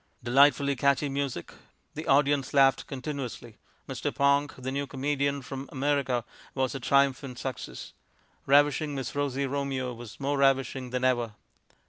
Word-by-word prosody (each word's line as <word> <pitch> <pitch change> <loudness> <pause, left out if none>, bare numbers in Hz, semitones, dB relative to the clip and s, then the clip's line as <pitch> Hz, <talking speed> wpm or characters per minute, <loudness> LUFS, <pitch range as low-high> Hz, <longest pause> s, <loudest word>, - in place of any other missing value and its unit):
Delightfully 140 +3 +4
catchy 140 +2 +2
music.... 135 -9 -3 0.4
The 155 +2 -6
audience 140 0 +2
laughed 135 -1 +4
continuously.... 135 -3 -6 0.3
Mr. - - -3
Ponk, 140 +1 +2
the 130 0 -4
new 140 +1 -2
comedian 140 0 -1
from 135 +2 -7
America, 135 -3 0 0.3
was 130 -1 0
a 135 - -4
triumphant 135 -1 +1
success.... 130 -1 -6 0.5
Ravishing 145 +1 +3
Miss 135 -3 -4
Rosie 140 -1 -1
Romeo 135 -2 -2
was 115 -2 -11
more 140 0 -1
ravishing 135 -2 +2
than 125 +1 -2
ever... 120 -4 +1
135 Hz, 135 wpm, -28 LUFS, 130-140 Hz, 0.5 s, Delightfully